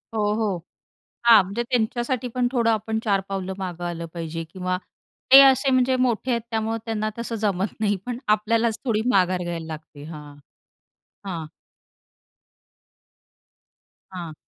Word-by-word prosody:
हो, 215 - +1
हो. 210 -4 0 0.7
हां, 230 -3 +8
म्हणजे 200 +6 -3
त्यांच्यासाठी 240 +1 -1
पण 250 -1 +1
थोडं 235 -3 +2
आपण 220 0 -1
चार 200 -3 +2
पावलं 190 -1 -3
मागे 175 -2 -5
आलं 170 -1 -4
पाहिजे 165 -1 -4
किंवा 185 +2 -3 0.6
ते 270 - +12
असे 270 0 +5
म्हणजे 255 0 +3
मोठे 255 0 0
आहेत 235 -1 +1
त्यामुळं 225 0 -1
त्यांना 215 -1 -2
तसं 235 0 -4
जमत 195 0 0
नाही, 205 -2 +2
पण 245 -1 -3
आपल्यालाच 220 +1 +2
थोडी 220 -3 +1
माघार 185 -3 +2
घ्यायला 170 -2 -4
लागते. 155 -2 -9
हां, 150 -2 -10 0.9
हां. 170 -5 -4 2.7
हां. 175 -4 -6
215 Hz, 135 wpm, -24 LUFS, 180-235 Hz, 2.7 s, ते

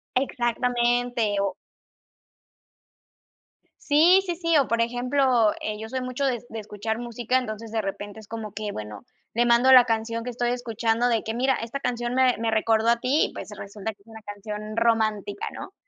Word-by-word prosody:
Exactamente, 240 -3 0
o 195 -2 0 2.2
Sí, 335 +6 +5
sí, 350 -2 -2
sí, 335 -2 +2
o, 275 - +3
por 230 0 +1
ejemplo, 245 -1 +2
eh, 215 0 -3
yo 220 0 -7
soy 260 0 -3
mucho 255 +2 -2
de, 245 -4 0
de 225 - -6
escuchar 215 +2 -4
música, 240 +1 -1
entonces, 220 -2 -5
de 225 -1 0
repente 205 +2 -6
es 210 - -14
como 220 -2 -6
que, 210 0 -4
bueno, 105 - -7 0.3
le 240 +1 +2
mando 240 +2 +5
la 250 -2 +9
canción 230 0 -1
que 250 - -5
estoy 240 0 -1
escuchando, 235 -1 0
de 230 -2 +1
que: 220 - -3
"Mira, 260 +3 +2
esta 230 +5 -5
canción 240 -1 -2
me, 255 -2 +3
me 225 0 -1
recordó 220 +1 +2
a 235 0 +3
ti". 270 +5 +2
Y - - -16
pues - - -8
resulta 205 +2 -6
que 200 - -32
es - - -35
una 220 -1 -12
canción 210 +1 -7
romántica, 215 -3 0
¿no? 380 - -9
230 Hz, 185 wpm, -25 LUFS, 215-250 Hz, 2.2 s, la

